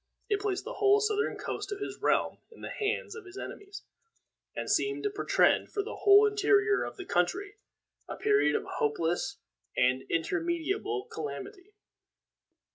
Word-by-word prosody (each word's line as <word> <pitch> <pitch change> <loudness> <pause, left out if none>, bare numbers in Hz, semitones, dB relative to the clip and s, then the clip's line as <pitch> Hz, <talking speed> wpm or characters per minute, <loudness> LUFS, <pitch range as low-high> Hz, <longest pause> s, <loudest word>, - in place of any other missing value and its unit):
It 410 -2 +2
placed 400 -2 -2
the - - -5
whole 405 0 +6
southern 425 +1 0
coast - - -5
of 410 - -4
his 410 - -5
realm - - +1
in 455 - -16
the - - -6
hands 425 0 -2
of 455 -3 -9
his 370 +1 -12
enemies, 400 0 -8 0.7
and - - -4
seemed 410 0 +1
to 415 - 0
portend 405 - +2
for 405 -2 -1
the 440 - -7
whole 405 +1 +7
interior 410 0 +3
of - - -6
the 375 - -7
country 385 - -1 0.5
a - - -4
period 415 -1 +3
of - - 0
hopeless 175 - -1 0.4
and 130 +1 +3
irremediable 345 - -1
calamity. 415 -3 -7
410 Hz, 155 wpm, -30 LUFS, 390-425 Hz, 0.7 s, whole